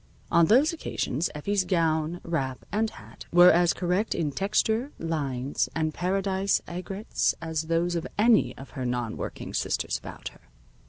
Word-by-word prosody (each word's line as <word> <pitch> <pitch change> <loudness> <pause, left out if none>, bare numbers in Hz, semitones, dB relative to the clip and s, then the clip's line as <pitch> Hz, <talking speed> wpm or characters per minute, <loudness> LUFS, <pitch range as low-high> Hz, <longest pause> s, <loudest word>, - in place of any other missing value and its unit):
On 170 -1 +5
those 270 - +5
occasions, 165 - -2
Effie's 195 +6 0
gown, 165 -2 0
wrap 135 -6 -3
and 220 +3 +1
hat - - -13
were 175 +1 +8
as 175 +1 +4
correct 180 +4 0
in 155 -3 -1
texture, 220 - 0
lines, 140 -5 -2
and 155 -1 0
paradise 190 +2 0
aigrettes 185 +4 -2
as 160 -1 -3
those 170 +1 +1
of 170 -1 -2
any 220 +1 +4
of 135 - -11
her 130 - -5
non 120 -2 -2
working - - -6
sisters - - -1
about - - -8
her. - - -21
170 Hz, 155 wpm, -27 LUFS, 155-195 Hz, -, were